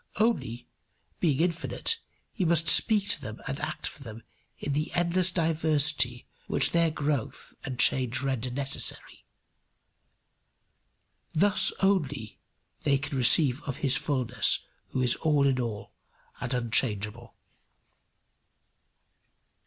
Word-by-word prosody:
Only, 200 - -1 0.5
being 150 -3 +1
infinite, 175 - 0 0.3
he 195 - -2
must 165 -1 +2
speak 210 -3 +5
to - - +2
them 105 +1 -8
and 135 - -4
act - - -5
for - - -8
them 115 -3 -10 0.3
in 145 - -4
the 150 +2 -2
endless 175 +1 +1
diversity 155 -6 +1 0.2
which - - +3
their 170 -1 +2
growth 150 -5 -3
and 130 -2 -6
change 130 -1 +3
render 130 -2 -2
necessary. 135 +2 -2 2.1
Thus 200 +5 +4
only 145 - -1 0.4
they 140 -1 +2
can 140 +1 -5
receive 130 +1 +4
of 135 - -5
his 135 -1 +1
fulness 130 - +2 0.2
who 130 - -2
is 125 - +3
all 150 -3 +1
in 135 -2 +1
all 115 -4 -5 0.5
and 125 0 -5
unchangeable. 115 -2 -1
140 Hz, 115 wpm, -27 LUFS, 125-160 Hz, 2.1 s, speak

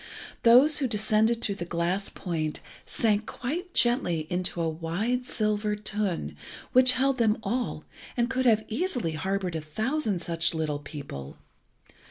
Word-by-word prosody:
Those 255 +7 +6
who 270 - +1
descended 220 +1 +2
through 200 - 0
the - - +1
glass 175 +3 -1
point 155 -4 -3 0.3
sank 215 -2 +1
quite 340 +9 -4
gently 180 - +2
into 180 -1 -2
a 165 - +1
wide 180 +11 -2
silver 210 -1 0
tun, 210 -3 -2 0.4
which 255 0 +7
held 265 +1 +1
them 220 -2 +3
all, 240 +4 -2 0.3
and 240 0 +2
could 260 0 0
have 220 -2 +4
easily 250 - -1
harboured 185 +2 -2
a 160 - -2
thousand 215 - -1
such 170 0 0
little 155 -2 -1
people. 140 - -8
210 Hz, 145 wpm, -27 LUFS, 170-245 Hz, 0.4 s, which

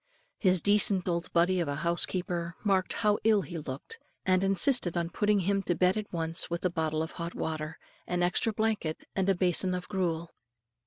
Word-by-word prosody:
His 185 -4 +4
decent 205 -2 +3
old 170 -1 -2
body 180 +2 +2
of 170 - -1
a 145 - -2
housekeeper 170 0 -1
marked 195 -3 +1
how 210 -2 +1
ill 215 -3 +3
he 165 +3 -6
looked, 150 - -8 0.3
and 185 0 +2
insisted 195 - +4
on 170 0 -2
putting 210 0 +1
him 195 +2 0
to 175 -2 -1
bed 180 +2 +2
at 215 -1 -5
once, 165 -1 0
with 170 +1 -3
a 180 - +1
bottle 160 -1 -1
of 160 - -6
hot 170 0 -6
water, 155 0 -4 0.3
an 180 0 -1
extra 180 +5 +1
blanket, 215 -7 -2
and 195 0 0
a 195 - +3
basin 180 +1 +2
of 180 0 -6
gruel. 170 -4 -2
180 Hz, 195 wpm, -29 LUFS, 170-195 Hz, 0.3 s, His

